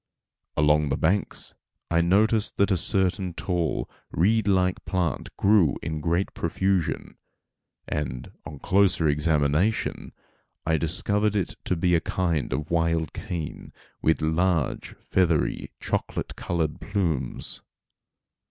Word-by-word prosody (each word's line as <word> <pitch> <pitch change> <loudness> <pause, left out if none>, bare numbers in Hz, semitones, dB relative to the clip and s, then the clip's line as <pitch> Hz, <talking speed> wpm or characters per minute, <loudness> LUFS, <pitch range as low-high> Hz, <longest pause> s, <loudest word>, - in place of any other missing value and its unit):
Along 75 0 +3
the 70 - 0
banks 95 +5 0 0.4
I 85 0 +4
noticed 105 +5 +2
that 100 0 +3
a - - +4
certain 95 -1 +1
tall, 85 -4 -1 0.2
reed 110 +6 +2
like 95 -2 +2
plant 90 -4 -1
grew 100 -7 +4
in 80 -1 -3
great 85 +5 0
profusion, 95 +1 -1 0.7
and, 65 -4 -4
on 70 0 -8
closer 95 0 +3
examination 75 +6 +1 0.5
I 80 0 +2
discovered 100 +5 0
it 100 -4 0
to 90 - +1
be 90 +1 +2
a 85 - +4
kind 85 -6 -1
of 75 +2 -3
wild 85 -2 +1
cane, 85 -5 -6 0.3
with 80 0 +2
large, 80 -1 0 0.2
feathery, 85 -4 +1
chocolate - - -3
colored 80 -3 -2
plumes. 85 - -1
85 Hz, 115 wpm, -26 LUFS, 80-95 Hz, 0.7 s, I